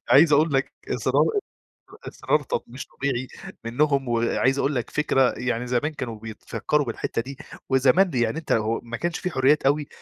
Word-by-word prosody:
عايز 150 +2 +7
أقول 150 +2 +4
لك 135 0 +1 0.2
إصرار - - +2 0.8
إصرار 150 - 0
ط 125 - -2
مش 125 +4 -8
طبيعي 130 -2 -3 0.4
منّهم 140 +3 +1
وعايز 120 +3 +1
أقول 140 +1 0
لك 125 - -2
فكرة 135 -4 +2
يعني 125 -1 -2
زمان 125 +6 0
كانوا 115 -6 -6
بيتفكّروا 115 +6 -2
بالحتّة 115 0 -3
دي 135 +3 -9 0.3
وزمان 135 +8 +4
دي 130 -7 -1
يعني 115 +5 0
أنت 160 - -7
هو 110 +1 +1
ما 115 -1 -6
كانش 170 +3 -2
في 180 - -3
حُريّات 135 +2 +3
أوي، 145 +1 +2
135 Hz, 175 wpm, -24 LUFS, 120-150 Hz, 0.8 s, عايز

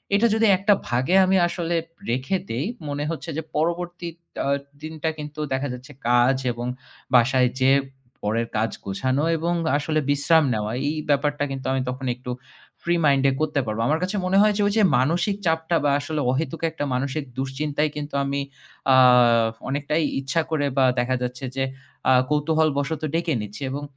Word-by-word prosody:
এটা 220 +4 +4
যদি 225 0 +3
একটা 200 +2 +4
ভাগে 130 +9 +1
আমি 190 +1 +3
আসলে 170 -1 -2 0.4
রেখে 130 +10 0
দেই 125 +5 -2 0.2
মনে 145 0 -2
হচ্ছে 165 +1 -6
যে 160 - -2
পরবর্তী 170 +2 -2 0.4
আ - - -1 0.3
দিনটা 160 0 -3
কিন্তু 150 0 -7
দেখা 130 +2 -1
যাচ্ছে 125 +4 -10 0.2
কাজ 120 +2 +4 0.2
এবং 120 0 -5 0.5
বাসায় 125 +1 +4
যেয়ে 135 +1 +5 0.4
পরের 115 +3 0
কাজ 110 +1 0
গোছানো 130 +8 -1
এবং 170 +2 -1 0.2
আসলে 155 +1 0
বিশ্রাম 145 +3 +4
নেওয়া, 105 -1 -2 0.2
এই 155 - -2
ব্যাপারটা 145 0 +1
কিন্তু 135 -1 -5
আমি 135 - 0
তখন 130 +1 -5
একটু 125 0 -7 0.5
ফ্রি 170 0 +1
মাইন্ডে 140 -1 +4
করতে 155 -2 +1
পারব। 110 0 -3
আমার 155 +2 +2
কাছে 185 +3 -2
মনে 185 +1 +2
হয় 210 0 +4
যে - - +1
ওই 205 - 0
যে 215 - +5
মানসিক 165 +10 +1
চাপটা 160 +1 +1
বা 145 - +3
আসলে 150 +1 -3
অহেতুক 160 +5 -2
একটা 160 - -4
মানসিক 140 +4 -2
দুশ্চিন্তায় 145 +3 -1
কিন্তু 150 0 -6
আমি 140 0 -1 0.5
আ - - +7 0.7
অনেকটাই 145 +3 0 0.2
ইচ্ছা 135 +4 0
করে 150 -2 +1
বা 135 - +5
দেখা 125 +1 +1
যাচ্ছে 125 +1 -4
যে 135 - 0 0.5
আ - - +7 0.2
কৌতূহলবশত 150 0 +1
ডেকে 165 0 0
এনেছি। 105 +1 -5
এবং 145 +2 -4
145 Hz, 170 wpm, -23 LUFS, 130-160 Hz, 0.7 s, আ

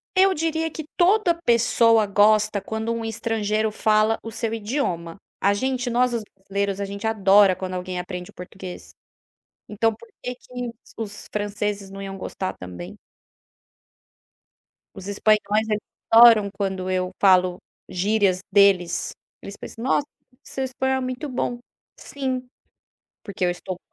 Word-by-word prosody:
Eu 380 +1 +5
diria 325 +1 -1
que 315 -1 -7
toda 370 0 +4
pessoa 230 -3 +4
gosta 210 0 +3
quando 220 +1 -3
um 230 0 -4
estrangeiro 220 -1 -1
fala 215 +1 +2
o 225 - -7
seu 225 0 -3
idioma. 205 - -2 0.2
A 200 +1 +4
gente, 255 +2 -1
nós 245 +1 +2
os 235 - -1 0.2
brasileiros 200 0 -2
a 200 - -1
gente 200 +2 -4
adora 200 -3 +5
quando 185 0 -5
alguém 180 0 -4
aprende 180 0 -6
o - - -15
português. 180 0 -9 0.8
Então 225 +2 +1
por 345 - -16
que 250 - -4
que 250 -1 -6 0.3
os 210 -2 -7
franceses 205 -1 -3
não 195 0 -8
iam 195 0 -6
gostar 185 0 -4
também? 90 -1 -9 2.0
Os 190 0 -9
espanhóis 210 +1 +2
eles 210 -1 0 0.3
adoram 225 -3 +8
quando 190 -2 -2
eu 185 0 -1
falo 185 -2 +4 0.3
gírias 195 0 +1
deles, 195 -4 +3 0.3
eles 200 - -9
pensam: 230 - -9
"Nossa, 275 +2 +2 0.4
seu 270 - -4
espanhol 265 0 -1
é - - -1
muito 255 +3 -4
bom", 245 -2 -2 0.4
sim, 260 -2 -4 0.8
porque 195 -3 -3
eu 180 - +3
estou 180 +1 -6
210 Hz, 145 wpm, -23 LUFS, 195-235 Hz, 2.0 s, adoram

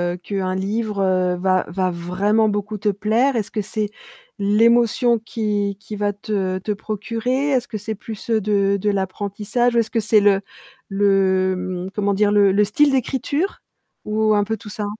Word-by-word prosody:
heu, - - -9
qu'un 185 0 -3
livre 205 +2 -2
heu, 185 -1 +2
va 185 0 +1
va 185 +1 -1
vraiment 195 +6 +1
beaucoup 205 +1 -3
te 205 +1 0
plaire? 220 +7 +1
Est-ce 215 - -3
que 215 - -1
c'est, 210 +1 -3 0.5
l'émotion 235 +3 +3
qu'il 210 -3 -2
qu'il 205 +1 -8
va 205 0 +1
te 200 -2 -2
te 200 +3 -4
procurer? 230 +7 -2
Est-ce 250 -3 0
que 220 - -4
c'est 215 +1 -5
plus, 215 +2 -9
heu, 220 -1 +2
de 200 -1 +1
de 210 - +1
l'apprentissage? 205 +5 -1
Ou - - +5
est-ce 225 -1 -1
que 230 - +1
c'est 215 0 +4
le 200 -1 +3 0.5
le 190 -2 +1
mmh, - - -9
comment 200 0 0
dire? 205 +1 +2
Le 200 -1 +5
le 205 +2 +3
style 285 +8 +3
d'écriture? 270 - -1 0.4
Ou 215 0 +1
un 205 - +3
peu 220 +2 -3
tout 210 - -11
ça? 210 -1 -4
205 Hz, 185 wpm, -21 LUFS, 195-220 Hz, 0.5 s, Ou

